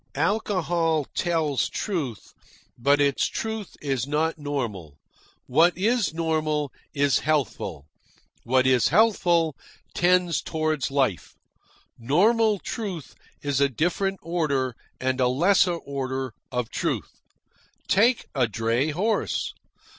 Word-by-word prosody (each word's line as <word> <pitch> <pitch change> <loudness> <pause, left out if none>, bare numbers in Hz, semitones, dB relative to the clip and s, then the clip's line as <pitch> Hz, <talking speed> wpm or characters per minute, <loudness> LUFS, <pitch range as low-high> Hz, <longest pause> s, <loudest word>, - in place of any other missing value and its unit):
Alcohol 170 -3 +1
tells 160 -6 0
truth, 150 - -4 0.4
but 140 +4 +3
its 140 -1 +2
truth 220 -3 -5
is 135 -3 -1
not 155 +2 0
normal. 115 - -4 0.5
What 165 +7 +3
is 225 +3 +1
normal 155 -3 -1 0.2
is 140 -1 +2
healthful. 125 - -1 0.6
What 130 +2 +2
is 130 -2 +4
healthful 175 - +3 0.4
tends 175 -2 +2
toward 155 -3 -1
life. 135 -9 -1 0.6
Normal 210 - +3
truth 190 - -5 0.3
is 140 -1 0
a 140 - +4
different 180 - 0
order, 140 -7 -1 0.2
and 130 0 0
a 125 - +4
lesser 175 +7 +3
order, 135 -5 -4 0.2
of 125 -2 -2
truth. - - -3 0.7
Take 230 +5 +3
a 130 -4 +2
dray 115 +6 0
horse. 200 +9 -1
150 Hz, 110 wpm, -25 LUFS, 130-175 Hz, 0.7 s, is